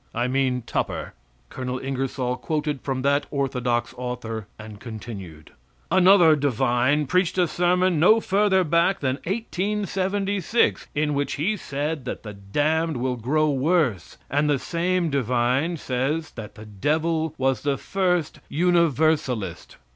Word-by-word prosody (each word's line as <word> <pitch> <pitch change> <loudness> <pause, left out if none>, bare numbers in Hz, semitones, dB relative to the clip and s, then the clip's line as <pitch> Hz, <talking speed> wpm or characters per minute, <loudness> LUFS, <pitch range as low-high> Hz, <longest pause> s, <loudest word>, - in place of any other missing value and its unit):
I 120 +2 0
mean 130 -1 0
Tupper. - - -3 0.4
[Colonel 130 -1 -4
Ingersoll 130 -1 -2
quoted 150 -2 -2
from 130 -2 -3
that 140 +1 +2
orthodox 125 -4 -1
author, 115 -4 -5
and 110 -1 -10
continued:] 100 -9 -9 0.4
Another 180 -4 +6
divine 135 +1 +1
preached 180 +5 +1
a 180 -1 +3
sermon 180 0 +2
no 215 +8 +6
further 195 -2 +2
back 170 +4 +2
than 130 -1 0
1876, 200 0 -1
in 150 0 +1
which 140 0 -1
he 185 +9 0
said 145 -4 -4
that - - -5
the 105 -2 -7
damned 150 +10 0
will 125 +1 -1
grow 150 +6 +1
worse; 140 - 0
and 145 +2 +1
the 145 - +3
same 175 +2 -1
divine 130 +5 +1
says 140 +4 -2
that 110 -1 -9
the 110 -1 -11
devil 155 - -1
was 135 0 +1
the 140 -1 0
first 180 -5 -1
Universalist. 155 - +1
145 Hz, 130 wpm, -24 LUFS, 125-170 Hz, 0.4 s, Another